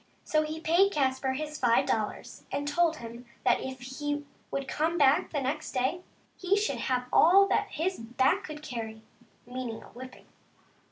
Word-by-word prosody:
So 310 - +2
he 310 +1 -4
paid 345 +5 +4
Caspar 265 -2 +1
his 300 +2 -5
five 235 -2 +3
dollars, 215 -1 -3
and 285 0 -2
told 330 +2 +2
him 235 -2 -9 0.2
that 245 - +3
if 260 -1 -6
he 290 +3 -4 0.2
would 275 -1 -3
come 320 +5 0
back 280 -2 +4
the 295 - -1
next 285 +4 -3
day 265 +7 0 0.3
he 375 +2 +1
should 420 +1 0
have 250 -1 0
all 390 +4 +7
that - - +2
his 365 +4 -2
back 260 - +1
could 305 -1 -8
carry 225 -5 -6 0.2
— - - -35
meaning 245 -2 -5
a - - -14
whipping. 255 +1 -11
280 Hz, 175 wpm, -29 LUFS, 250-315 Hz, 0.3 s, all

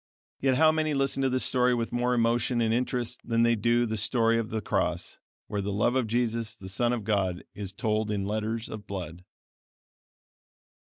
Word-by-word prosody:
Yet 130 -1 +2
how 155 +3 +5
many 155 -1 0
listen 135 0 +1
to 135 - +2
this 130 0 +1
story 125 -1 +3
with 115 -1 -2
more 125 +1 +1
emotion 120 +1 +1
and 115 -1 +2
interest 125 0 -1
than 115 0 +1
they 115 0 +4
do 120 +2 +2
to - - +2
the 110 -1 -2
story 115 +2 +2
of 115 -1 -3
the 110 - -2
cross, 105 - -2 0.3
where 105 - -3
the 100 +1 -3
love 105 +5 +1
of 130 -4 +1
Jesus, 115 -1 -1
the 95 -2 -8
Son 120 +5 +1
of 120 -3 -2
God, 95 -4 0
is 100 -2 -5
told 110 +1 -1
in 100 -2 -1
letters 110 +2 -2
of 105 -2 -8
blood! 90 -3 -6
115 Hz, 200 wpm, -28 LUFS, 105-125 Hz, 0.3 s, how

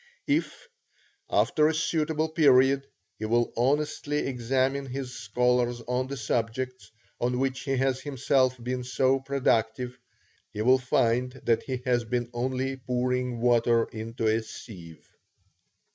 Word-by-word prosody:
If, 300 +10 -1 0.6
after 150 -1 +3
a 160 - 0
suitable 160 -1 0
period, 135 -3 +4 0.3
he 110 - -3
will 120 +2 +1
honestly 145 +3 0
examine 135 +2 0
his 130 -1 -5
scholars 120 +2 +1
on 125 +2 -2
the 140 +1 -5
subjects, 125 +2 -2 0.3
on 125 +1 0
which 130 0 -1
he 135 -1 -2
has 130 0 0
himself 135 -2 +1
been 125 +1 -2
so 130 +1 +2
productive, 125 -3 0 0.5
he 105 - -4
will 130 +2 +5
find 125 0 +1
that 115 -1 +2
he 130 -2 -5
has 120 -2 +2
been 120 +1 -2
only 130 +2 -2
pouring 125 -1 -1
water 120 -1 +3
into 115 +1 -5
a 110 +1 +2
sieve. 90 -7 -11
125 Hz, 130 wpm, -27 LUFS, 120-135 Hz, 0.6 s, will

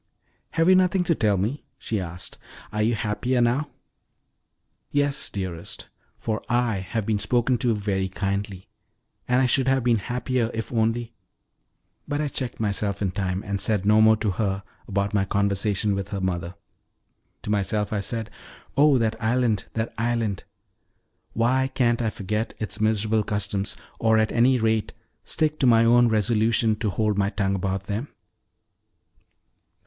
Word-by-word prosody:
"Have 165 0 +2
you 185 - +7
nothing 185 0 +3
to 175 - +2
tell 105 -8 +1
me?" 110 +10 -2
she 110 -4 -3
asked. 90 0 -7 0.3
"Are 105 - 0
you 115 +2 +2
happier 110 +4 -1
now?" 125 +5 +1 1.2
"Yes, 145 0 0
dearest, 90 -4 -6 0.3
for 110 -1 -3
I 120 -3 +1
have 95 +3 -3
been 105 -1 0
spoke 120 +4 +1
to 115 -1 +1
very 100 -2 -1
kindly; 100 0 -3 0.6
and 125 +1 +3
I - - +4
should 130 +1 +3
have 135 -1 +2
been 120 -2 +3
happier 125 +1 -1
if 115 +2 -4
only 115 +1 0 0.5
" - - -48
But 145 0 -2
I 150 -1 -1
checked 130 -3 -3
myself 100 -1 -1
in 95 - 0
time, 95 -1 -2
and 100 -2 -2
said 100 -1 0
no 105 +1 +5
more 110 0 +6
to 105 -2 0
her 95 -1 -2 0.2
about 100 0 -1
my 100 -2 +2
conversation 100 +1 +1
with 100 0 -3
the 100 - -3
mother. 90 -1 -2 0.9
To 105 - -3
myself 105 +1 0
I 105 - 0
said: 110 +2 -3 0.4
"Oh, 145 -1 +5
that 110 -2 +1
island, 115 -2 +1
that 110 0 -2
island! 115 -4 -1 0.9
Why 130 +3 +2
can't 120 -2 +2
I 115 - +1
forget 105 +2 -3
its 110 0 -3
miserable 110 0 +2
customs, 100 -1 -2 0.2
or, 110 -1 +3
at 110 0 +2
any 125 +2 +4
rate, 110 -2 0 0.3
stick 155 -1 0
to 130 - +3
my 115 -1 +5
own 120 +1 +5
resolution 110 +1 +2
to 110 -1 -1
hold 105 +1 0
my 100 0 +2
tongue 100 -2 -1
about 95 0 -2
them?" 105 +7 -3
110 Hz, 160 wpm, -24 LUFS, 100-120 Hz, 1.2 s, you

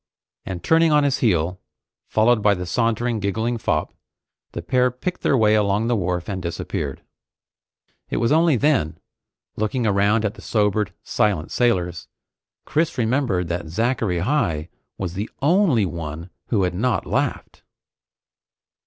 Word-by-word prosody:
And 90 -2 -5
turning 165 0 +4
on 150 -1 +4
his 140 -2 +1
heel, 90 -4 +1 0.5
followed 110 +1 +3
by 100 0 +4
the 90 0 -5
sauntering, 115 +3 0
giggling 110 +4 -1
fop, 75 -7 -1 0.6
the - - -5
pair 125 0 +2
picked 125 +9 -5
their 135 - +2
way 110 -2 +4
along 105 0 +2
the 120 +1 +1
wharf 90 -3 -2
and 95 -2 -3
disappeared. 85 -1 -4 1.1
It - - -2
was 115 +2 +1
only 160 -1 +4
then, 125 - +1 0.6
looking 110 +3 -1
around 105 +2 +2
at 105 - -1
the 110 - -13
sobered, 105 -2 0
silent 95 -7 0
sailors, 90 - 0 0.6
Chris 160 +2 0
remembered 115 -7 0
that 85 -1 -3
Zachary 110 +1 0
Heigh 90 - 0 0.3
was 90 -3 -4
the 100 +4 -4
only 150 - +3
one 85 0 -6 0.2
who 105 -5 +1
had 90 -1 0
not 115 +6 0
laughed. - - -2
105 Hz, 145 wpm, -22 LUFS, 90-125 Hz, 1.1 s, turning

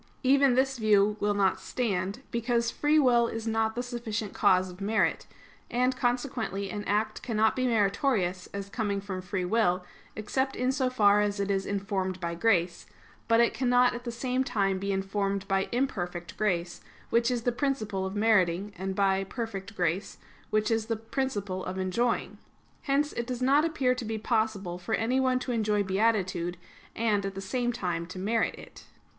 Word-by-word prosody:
Even 270 -1 +4
this 265 0 +1
view 210 -1 +4
will 205 0 +1
not 195 -2 +2
stand, 205 0 -2
because 235 0 0
free 295 +1 +2
will 245 -5 +4
is 225 -1 -5
not 220 0 0
the 245 - -2
sufficient 230 -4 -4
cause 185 0 +3
of 180 +2 -13
merit; 215 +3 +1 0.4
and, 250 +2 +1
consequently, 245 -6 -2
an 205 -1 -4
act 210 +2 0
cannot 220 -3 +1
be 255 0 +1
meritorious 200 -4 +1
as 200 0 -5
coming 205 -1 -2
from 195 -2 -5
free 185 0 -3
will, 180 -3 +1 0.3
except 265 +6 -1
in 250 +1 +1
so 260 -1 0
far 210 -4 +4
as 205 0 -1
it 200 0 0
is 195 -1 -1
informed 195 -2 -2
by 170 -1 -3
grace; 175 -2 +1 0.4
but 230 0 +4
it 235 - +4
cannot 245 -1 +3
at 240 0 -6
the 240 - -4
same 255 +2 -1
time 200 -7 0
be 200 +1 -2
informed 195 0 -1
by 195 -1 0
imperfect 180 -9 -2
grace, 175 -5 -1 0.3
which 235 +1 +3
is 245 -2 -1
the 245 - +2
principle 230 -7 -1
of 190 +1 -4
meriting, 205 -2 +2
and 190 0 -3
by 195 -1 +2
perfect 210 -1 -6
grace, 180 +2 -1 0.3
which 215 +1 +1
is 225 -1 0
the 230 - 0
principle 210 -5 -3
of 185 +1 -5
enjoying. 205 +6 -1 0.5
Hence 290 +1 +1
it 235 - -3
does 250 -1 -3
not 280 +4 +4
appear 275 -6 +1
to 250 - -5
be 220 0 -3
possible 215 -5 -1
for 200 +5 -1
anyone 255 +2 +1
to 255 0 -3
enjoy 210 -3 +1
beatitude, 190 -3 0 0.4
and 215 -3 +1
at 195 -1 -4
the - - -4
same 240 +5 -1
time 175 -7 -3
to 185 - -9
merit 220 +5 0
it. - - -13
215 Hz, 180 wpm, -28 LUFS, 195-245 Hz, 0.5 s, Even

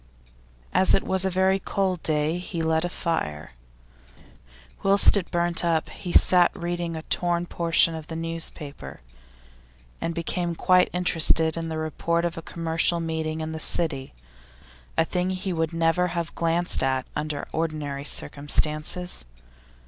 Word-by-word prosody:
As 185 +1 +4
it - - 0
was 190 0 0
a - - +2
very 190 +1 +2
cold 190 -3 -1
day 155 +2 0
he 175 -2 -4
lit 160 0 +1
a 175 - -2
fire. 120 - -3 1.3
Whilst 200 +2 +5
it 195 -4 -1
burnt 175 0 0
up 165 -2 0
he 180 - -7
sat 180 -1 +6
reading 175 -2 -3
a 160 - -6
torn 175 0 -1
portion 170 -1 +2
of 160 0 -8
a - - -4
newspaper, 160 - -3 1.0
and 165 - -3
became 170 0 -2
quite 180 +2 +3
interested 165 -2 +3
in 165 -1 -4
the 160 - -4
report 170 +2 -1
of 170 - -2
a 165 - -6
commercial 165 +1 0
meeting 160 -1 -3
in 155 0 -4
the 160 - -5
City, 155 -5 0 0.8
a 165 - +3
thing 180 +2 -1
he 185 0 -3
would 160 -1 -1
never 165 +2 +1
have 170 -1 -4
glanced 170 +1 +1
at 130 -1 0
under 150 -1 -3
ordinary 150 -4 -3
circumstances. 150 - 0
165 Hz, 150 wpm, -25 LUFS, 160-175 Hz, 1.3 s, sat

